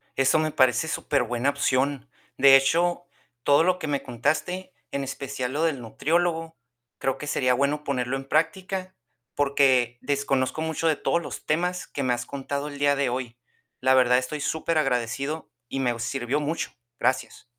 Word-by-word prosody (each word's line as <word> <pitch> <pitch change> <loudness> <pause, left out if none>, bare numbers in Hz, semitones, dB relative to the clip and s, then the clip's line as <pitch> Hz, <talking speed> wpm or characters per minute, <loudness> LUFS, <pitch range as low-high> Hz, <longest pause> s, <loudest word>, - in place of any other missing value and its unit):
eso 135 +4 +3
me 155 0 0
parece 130 +2 +3
superbuena 125 -4 0
opción. 140 -1 0 0.3
De 135 0 +8
hecho, 170 +6 +2 0.4
todo 145 +4 +5
lo 180 +1 +2
que 155 - -4
me 145 -1 -1
contaste, 155 +10 -2 0.2
en 140 - -2
especial 135 -1 -4
lo 155 +3 0
del 155 -6 0
nutriólogo, 165 +6 -1 0.4
creo 135 - 0
que 150 - -7
sería 130 -3 +2
bueno 140 +3 0
ponerlo 130 -2 -1
en 135 0 -9
práctica, 185 +4 -1 0.4
porque 135 -4 +3
desconozco 140 0 0
mucho 160 +1 -1
de 160 - +3
todos 170 - 0
los - - -7
temas 180 +4 -1
que 140 - -4
me 125 -1 +2
has 120 0 -3
contado 140 +1 -4
el 145 - -9
día 145 0 +3
de 140 -2 +1
hoy. 120 -1 -4 0.4
La 130 0 +4
verdad, 125 -1 +5
estoy 145 +3 -3
superagradecido 140 -2 -1 0.2
y 135 - -4
me 120 -3 0
sirvió 135 +3 -1
mucho. 150 +3 -2 0.3
Gracias. 125 +2 -1
140 Hz, 165 wpm, -25 LUFS, 130-155 Hz, 0.4 s, De